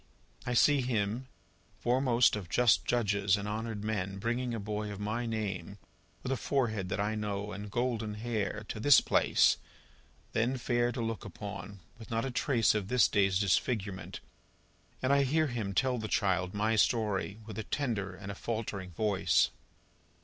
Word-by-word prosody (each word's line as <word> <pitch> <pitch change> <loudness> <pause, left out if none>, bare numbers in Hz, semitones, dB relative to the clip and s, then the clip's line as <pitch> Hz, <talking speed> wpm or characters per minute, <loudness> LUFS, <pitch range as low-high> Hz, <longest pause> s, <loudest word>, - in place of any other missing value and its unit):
I 125 - 0
see 145 +3 +5
him, 120 0 -1 0.5
fore 125 +2 +1
most 120 -4 +4
of 95 -5 -6
just 120 -3 +4
judges 100 -4 +2
and 100 0 -4
honoured 110 0 -4
men, 100 -3 -2
bringing 120 +4 -1
a 115 - -3
boy 105 0 -3
of 100 - -7
my 110 +3 -2
name, 100 -4 -3 0.5
with 130 - -3
a 135 - +1
forehead 110 -8 -1
that 95 - -2
I 105 +2 0
know 105 -1 -3
and 105 +2 -6
golden 115 -2 -1
hair, 110 -1 -3
to - - -4
this 145 +4 +7
place - - +3 0.7
then 120 +4 +1
fair 120 0 +1
to 120 - -4
look 115 -1 -3
upon, 100 -1 -8 0.2
with 110 - -11
not 115 +1 -1
a 135 - -3
trace 120 -3 +2
of 105 -3 -2
this 125 +1 +4
day's 95 -3 +2
disfigurement 100 0 -1 0.8
and 130 +2 +3
I 140 - +5
hear 155 +4 +2
him 115 -8 -3
tell 125 +4 +1
the 110 - -4
child 95 -2 0
my 110 +2 +1
story, 105 -2 +1
with 110 -1 -7
a - - -3
tender 105 -7 -2
and 95 +2 -7
a - - -5
faltering 100 -3 -4
voice. 105 0 +2
110 Hz, 170 wpm, -31 LUFS, 100-120 Hz, 0.8 s, this